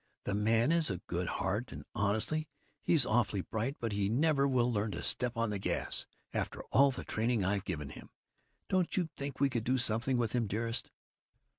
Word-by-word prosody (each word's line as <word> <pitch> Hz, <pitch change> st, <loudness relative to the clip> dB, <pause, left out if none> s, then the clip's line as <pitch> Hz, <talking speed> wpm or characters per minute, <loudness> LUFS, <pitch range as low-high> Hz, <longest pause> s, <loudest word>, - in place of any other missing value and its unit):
The -, -, -2 dB
man 110 Hz, +6 st, +3 dB
has 165 Hz, -4 st, +2 dB
a 95 Hz, -, -1 dB
good 90 Hz, 0 st, -2 dB
heart, 100 Hz, +10 st, -1 dB
and -, -, -8 dB
honestly, 110 Hz, +9 st, 0 dB, 0.3 s
he's 155 Hz, -7 st, +3 dB
awfully 110 Hz, -3 st, +2 dB
bright, 115 Hz, +8 st, -2 dB
but 115 Hz, -2 st, -2 dB
he 100 Hz, -1 st, 0 dB
never 140 Hz, +3 st, +3 dB
will 125 Hz, -2 st, +2 dB
learn 105 Hz, 0 st, 0 dB
to -, -, -5 dB
step 125 Hz, -1 st, 0 dB
on 115 Hz, -2 st, +1 dB
the 100 Hz, -, -2 dB
gas, -, -, -2 dB, 0.3 s
after -, -, -2 dB
all 140 Hz, +1 st, +6 dB
the 130 Hz, -, -4 dB
training 110 Hz, -2 st, 0 dB
I've 100 Hz, +1 st, 0 dB
given 75 Hz, -7 st, -3 dB
him. -, -, -11 dB, 0.6 s
Don't 185 Hz, -1 st, +1 dB
you 175 Hz, -3 st, +1 dB
think 140 Hz, -1 st, -5 dB
we 140 Hz, -, +5 dB
could 120 Hz, -3 st, -1 dB
do 130 Hz, +3 st, +2 dB
something 120 Hz, +2 st, +1 dB
with 115 Hz, -3 st, +1 dB
him, 120 Hz, -3 st, +1 dB
dearest?" 115 Hz, +4 st, -2 dB
115 Hz, 195 wpm, -33 LUFS, 105-130 Hz, 0.6 s, all